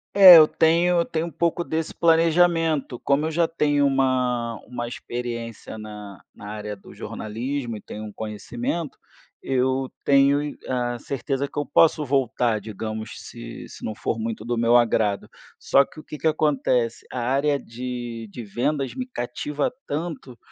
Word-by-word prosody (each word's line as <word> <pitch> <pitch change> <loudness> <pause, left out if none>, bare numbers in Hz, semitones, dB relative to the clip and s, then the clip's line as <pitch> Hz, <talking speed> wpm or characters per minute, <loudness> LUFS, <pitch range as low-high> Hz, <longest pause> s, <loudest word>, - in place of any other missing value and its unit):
É 185 -4 +12
eu 155 - +8
tenho 170 +3 +3
eu 170 - +2
tenho 160 0 -2
um 170 - -6
pouco 170 0 0
desse 160 -1 -2
planejamento, 165 -4 +3
como 140 +2 +1
eu 160 - -1
já 170 +1 +2
tenho 145 -3 +2
uma 125 -4 0
uma 120 -1 -4
experiência 120 -2 -6
na 105 -3 -9
na 100 - -9
área 105 -1 -5
do 100 - -15
jornalismo 120 +3 -4
e - - -11
tenho 105 - -8
um 105 - -8
conhecimento, 120 +8 -4 0.5
eu 130 0 0
tenho, 140 +1 +4
eh, - - -6
a 120 -1 -1
certeza 140 +1 -2
que - - -14
eu 145 - 0
posso 155 -2 +4
voltar 125 -5 +1
digamos, 110 +1 -5
se 115 0 -9
se - - -13
não 110 - -3
for 115 - -2
muito 110 -1 -4
do 120 0 -1
meu 115 +1 +4
agrado. 110 -3 +1 0.3
Só 140 - +4
que 155 - -14
o - - -11
que 150 - -9
que 160 - +1
acontece, 135 -6 +1
a 125 - -4
área 140 +4 +1
de 120 -1 -6
de 120 +2 -8
vendas 130 +6 -1
me 255 0 -4
cativa 145 - -3 0.2
tanto, 145 -5 -5
130 Hz, 165 wpm, -24 LUFS, 115-150 Hz, 0.5 s, É